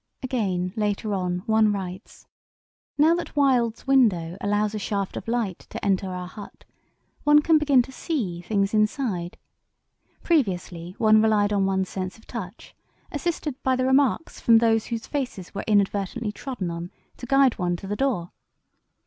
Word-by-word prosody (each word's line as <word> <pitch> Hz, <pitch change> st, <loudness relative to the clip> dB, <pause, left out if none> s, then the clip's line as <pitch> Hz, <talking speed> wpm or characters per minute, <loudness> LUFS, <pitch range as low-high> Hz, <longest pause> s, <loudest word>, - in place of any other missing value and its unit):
Again, 190 Hz, -8 st, -1 dB
later 210 Hz, 0 st, -1 dB
on, 180 Hz, -1 st, -2 dB
one 220 Hz, -2 st, +3 dB
writes: 190 Hz, 0 st, -6 dB, 0.7 s
"Now 310 Hz, +3 st, +5 dB
that 345 Hz, -2 st, -4 dB
Wild's 250 Hz, -5 st, +2 dB
window 205 Hz, -12 st, +3 dB
allows 205 Hz, +1 st, 0 dB
a 215 Hz, -, -3 dB
shaft 200 Hz, -1 st, -3 dB
of -, -, -6 dB
light 230 Hz, -6 st, -1 dB
to -, -, -6 dB
enter 195 Hz, -1 st, +1 dB
our 180 Hz, -1 st, -5 dB
hut, 205 Hz, +2 st, -12 dB, 0.6 s
one 295 Hz, 0 st, +5 dB
can 320 Hz, -1 st, +4 dB
begin 280 Hz, -4 st, +4 dB
to 265 Hz, -, -12 dB
'see' 230 Hz, -, -3 dB
things 195 Hz, +2 st, 0 dB
inside. 215 Hz, -5 st, 0 dB, 0.9 s
Previously 180 Hz, -, -1 dB
one 215 Hz, -1 st, +5 dB
relied 210 Hz, -2 st, +3 dB
upon 200 Hz, -2 st, +2 dB
one's 190 Hz, -1 st, 0 dB
sense 185 Hz, +1 st, -5 dB
of 220 Hz, -, -20 dB
touch, 205 Hz, -3 st, -8 dB, 0.4 s
assisted 300 Hz, -3 st, -3 dB
by 260 Hz, -1 st, +2 dB
the 255 Hz, 0 st, 0 dB
remarks 265 Hz, +3 st, +2 dB
from 230 Hz, -1 st, +5 dB
those 225 Hz, -1 st, +2 dB
whose 230 Hz, -1 st, -4 dB
faces 250 Hz, -11 st, -4 dB
were 200 Hz, -, -4 dB
inadvertently 205 Hz, +2 st, +1 dB
trodden 210 Hz, -6 st, -5 dB
on, 170 Hz, +1 st, -6 dB, 0.3 s
to 245 Hz, -, -8 dB
guide 270 Hz, -2 st, +3 dB
one 175 Hz, -1 st, 0 dB
to 175 Hz, -, -9 dB
the 205 Hz, +2 st, -3 dB
door. 215 Hz, -10 st, -1 dB
215 Hz, 160 wpm, -25 LUFS, 190-255 Hz, 0.9 s, Now